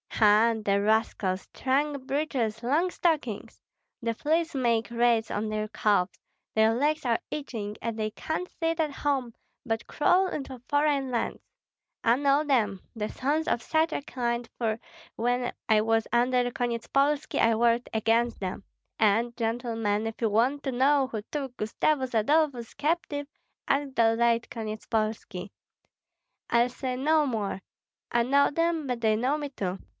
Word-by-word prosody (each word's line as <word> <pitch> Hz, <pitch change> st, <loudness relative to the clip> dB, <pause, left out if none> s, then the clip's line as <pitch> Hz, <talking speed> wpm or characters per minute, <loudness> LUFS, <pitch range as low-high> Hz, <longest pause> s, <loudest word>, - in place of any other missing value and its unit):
Ha! 215 Hz, +1 st, +5 dB
the 200 Hz, 0 st, +3 dB
rascals, 205 Hz, -3 st, 0 dB
trunk 275 Hz, +1 st, 0 dB
breeches, 260 Hz, -6 st, -1 dB
long 305 Hz, +9 st, +1 dB
stockings! 300 Hz, -, -1 dB, 0.4 s
The 230 Hz, 0 st, 0 dB
fleas 325 Hz, +7 st, 0 dB
make 235 Hz, -4 st, +1 dB
raids 235 Hz, -1 st, +2 dB
on 215 Hz, +1 st, -2 dB
their 215 Hz, 0 st, -2 dB
calves, 210 Hz, -3 st, +1 dB, 0.3 s
their 220 Hz, +1 st, +4 dB
legs 295 Hz, +3 st, 0 dB
are 235 Hz, -2 st, +2 dB
itching, 225 Hz, -8 st, -4 dB
and 230 Hz, -1 st, -3 dB
they 215 Hz, -1 st, -1 dB
can't 320 Hz, +10 st, -3 dB
sit 330 Hz, 0 st, 0 dB
at 310 Hz, -2 st, +1 dB
home, 270 Hz, -4 st, -1 dB, 0.3 s
but 225 Hz, -2 st, -2 dB
crawl 360 Hz, +5 st, +3 dB
into 270 Hz, -6 st, -5 dB
foreign 290 Hz, -2 st, +2 dB
lands. 240 Hz, -2 st, -2 dB, 0.6 s
I 230 Hz, +2 st, +4 dB
know 285 Hz, +1 st, +3 dB
them, 220 Hz, -10 st, +1 dB
the 215 Hz, -1 st, -3 dB
sons 295 Hz, +5 st, -1 dB
of 235 Hz, -, 0 dB
such 320 Hz, +1 st, +1 dB
a -, -, -2 dB
kind, 235 Hz, -3 st, -2 dB
for 225 Hz, -2 st, 0 dB, 0.4 s
when 245 Hz, +1 st, 0 dB, 0.2 s
I 215 Hz, -1 st, +5 dB
was 225 Hz, 0 st, +1 dB
under 245 Hz, +1 st, +2 dB
Konyetspolski 275 Hz, +4 st, 0 dB
I 230 Hz, 0 st, +4 dB
worked 235 Hz, +1 st, +2 dB
against 225 Hz, +2 st, +1 dB
them; 190 Hz, 0 st, -4 dB, 0.4 s
and, 225 Hz, +3 st, +2 dB
gentlemen, 225 Hz, -2 st, -1 dB
if 225 Hz, +1 st, -5 dB
you 225 Hz, -, +2 dB
want 245 Hz, +7 st, +2 dB
to 270 Hz, -, -1 dB
know 270 Hz, +2 st, +3 dB
who 220 Hz, -4 st, -4 dB
took 270 Hz, -4 st, -4 dB
Gustavus 260 Hz, +4 st, 0 dB
Adolphus 250 Hz, +1 st, +1 dB
captive, 295 Hz, -2 st, -1 dB, 0.4 s
ask 275 Hz, -1 st, 0 dB
the 225 Hz, -1 st, +4 dB
late 235 Hz, 0 st, +2 dB
Konyetspolski. 215 Hz, -3 st, -3 dB, 1.0 s
I'll 235 Hz, +1 st, +3 dB
say 255 Hz, +1 st, -4 dB
no 305 Hz, +4 st, +3 dB
more! 215 Hz, -7 st, -2 dB, 0.5 s
I 235 Hz, -, +3 dB
know 280 Hz, +4 st, +3 dB
them, 330 Hz, 0 st, 0 dB
but 250 Hz, -3 st, -3 dB
they 220 Hz, -1 st, +3 dB
know 255 Hz, +7 st, +1 dB
me 290 Hz, -1 st, -4 dB
too. 190 Hz, -8 st, -4 dB
240 Hz, 150 wpm, -27 LUFS, 225-280 Hz, 1.0 s, Ha